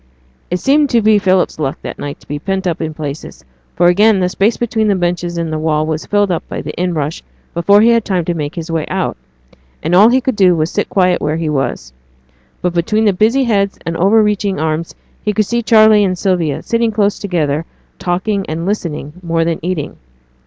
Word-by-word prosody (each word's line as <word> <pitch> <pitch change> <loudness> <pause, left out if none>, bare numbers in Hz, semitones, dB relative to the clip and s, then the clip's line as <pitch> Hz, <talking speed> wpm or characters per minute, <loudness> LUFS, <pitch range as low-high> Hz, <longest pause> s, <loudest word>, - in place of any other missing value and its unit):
It 180 - 0
seemed 285 +4 +3
to 235 -2 +3
be 215 -1 +4
Philip's 185 -4 +1
luck 140 -2 -2
this - - -5
night 145 0 -6
to - - -21
be 145 0 -4
pent 190 +3 -3
up 170 -3 -1
in 160 -1 -2
places; 145 - -7 0.3
for 175 - +2
again 200 +4 +4
the 180 -1 +1
space 200 +5 +1
between 220 -2 0
the 200 - +2
benches 175 -1 -2
and 165 -2 -2
the 155 - -2
wall 155 -1 0
was 160 0 -3
filled 205 -2 +1
up 170 - -1
by - - -5
the - - -6
in 180 -1 -2
rush 150 +1 -3 0.3
before 200 +5 +4
he 230 - +5
had 230 -1 +3
time 185 -5 -1
to 175 - -1
make 150 -1 -4
his 165 -1 -5
way 160 -2 -2
out; - - -2 0.7
and 160 +3 -1
all 200 +5 +7
he 255 +2 +3
could 260 -1 -2
do 185 -3 +4
was 155 +1 -1
to - - -15
sit 205 - -1
quiet 185 -2 +2
where 155 +2 -1
he 165 -1 -2
was. 135 - -3 0.7
But 180 -1 0
between 210 +6 +1
the 205 - +4
busy 225 +8 +2
heads 200 -5 0
and 165 - -3
over 205 +6 +4
reaching 205 -3 0
arms 160 +1 -2 0.3
he 210 - -1
could 215 +1 +1
see 235 +3 -1
Charley 215 -2 +5
and 185 -2 0
Sylvia, 175 -6 -1
sitting 230 0 +1
close 205 -1 0
together, 165 -6 -1 0.3
talking 195 +3 -1
and 165 +2 -3
listening 165 -7 -3
more 165 -1 0
than 165 -1 -1
eating. 175 -4 -3
180 Hz, 225 wpm, -15 LUFS, 160-210 Hz, 0.7 s, all